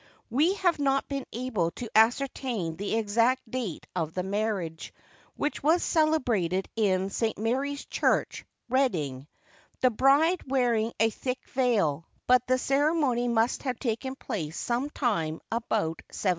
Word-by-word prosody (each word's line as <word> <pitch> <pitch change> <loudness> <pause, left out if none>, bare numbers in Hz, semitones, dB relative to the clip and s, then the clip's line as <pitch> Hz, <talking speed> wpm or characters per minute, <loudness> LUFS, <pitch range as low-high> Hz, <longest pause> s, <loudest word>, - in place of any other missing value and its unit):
We 310 - +3
have 355 -5 +1
not 275 -1 +1
been 275 -2 -4
able 225 -8 -1
to 245 - -5
ascertain 225 -5 +2
the 200 +5 -2
exact 230 +3 +1
date 235 -11 -4
of 160 -3 -2
the 180 - -1
marriage, 195 -5 -3 0.4
which 295 - -2
was 320 +5 +3
celebrated 240 - +1
in 195 -3 +1
St. 225 +1 -1
Mary's 270 +6 -1
Church, - - 0 0.2
Reading, 165 - 0 0.5
the 255 - +4
bride 285 +9 +4
wearing 240 -4 +1
a 225 +1 +3
thick 255 +3 -4
veil; 200 - +1 0.2
but 250 0 +4
the 255 0 +3
ceremony 275 -3 +1
must 235 0 +1
have 255 -3 -2
taken 260 +2 -3
place 170 - -5
some 245 +4 -1
time 165 - -1
about 220 -8 -1
1705. 195 - -2
235 Hz, 140 wpm, -28 LUFS, 200-270 Hz, 0.5 s, the